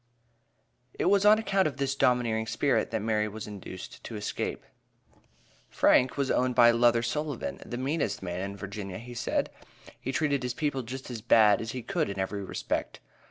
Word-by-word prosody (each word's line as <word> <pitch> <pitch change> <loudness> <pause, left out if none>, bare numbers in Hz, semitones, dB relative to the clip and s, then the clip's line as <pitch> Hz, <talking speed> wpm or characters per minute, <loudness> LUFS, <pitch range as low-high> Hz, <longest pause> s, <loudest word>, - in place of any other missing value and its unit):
It 185 - +2
was 200 0 +4
on 210 +1 +8
account 195 -4 +1
of 140 -3 -5
this 135 -1 0
"domineering 120 -4 +1
spirit," 140 +5 +1
that 110 -2 -2
Mary 110 -1 +1
was 105 +1 -7
induced 95 -3 -9
to 115 - -6
escape. 105 0 -3 1.1
Frank 125 +2 +3
was 140 -2 0
owned 125 0 +1
by 120 -1 +7
Luther 120 0 +3
Sullivan, 145 +2 -3
"the 120 - -6
meanest 140 -2 -1
man 90 0 -3
in 100 +1 -5
Virginia," 100 -1 -6
he 120 +2 -9
said; 120 - -1 0.5
he 130 - -3
treated 140 0 +1
his 125 -1 -3
people 145 -3 -1
just 130 +2 -7
as 115 -3 -6
bad 105 -3 +5
as 110 0 -5
he 125 -2 -5
could - - -1
in 100 - -5
every 100 +1 -2
respect. - - -3
120 Hz, 180 wpm, -28 LUFS, 105-135 Hz, 1.1 s, on